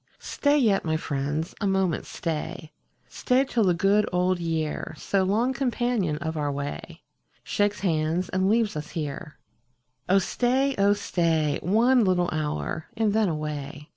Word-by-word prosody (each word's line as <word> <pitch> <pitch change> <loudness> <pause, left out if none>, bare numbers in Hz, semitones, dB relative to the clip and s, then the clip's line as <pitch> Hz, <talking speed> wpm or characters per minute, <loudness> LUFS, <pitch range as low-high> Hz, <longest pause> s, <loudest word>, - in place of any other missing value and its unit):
Stat 290 +1 +1
yet, 200 -4 +3
my 160 -1 0
friends, 150 +2 -3
a 205 - +1
moment 190 -4 0
stay 160 0 -4 0.2
— - - -42
Stay 255 +1 +1
till 240 -5 0
the 180 -2 +3
good 200 +4 +2
old 180 0 +1
year, 160 -2 -3
So 195 - 0
long 220 +7 +1
companion 240 - 0
of 160 0 -4
our 145 -2 -1
way, 140 - -6 0.4
Shakes 205 0 0
hands, 165 -1 0
and 190 +1 +1
leaves 225 -3 +2
ns 150 0 -5
here. 150 +1 -5 0.7
Oh 195 - +5
stay, 255 +7 +1
oh 200 +1 +5
stay. 165 -7 0
One 235 +7 +3
little 180 -2 +2
hour, 155 0 -3
and 215 -2 +2
then 215 -3 +2
away. 150 -1 -5
180 Hz, 155 wpm, -26 LUFS, 155-210 Hz, 0.7 s, Oh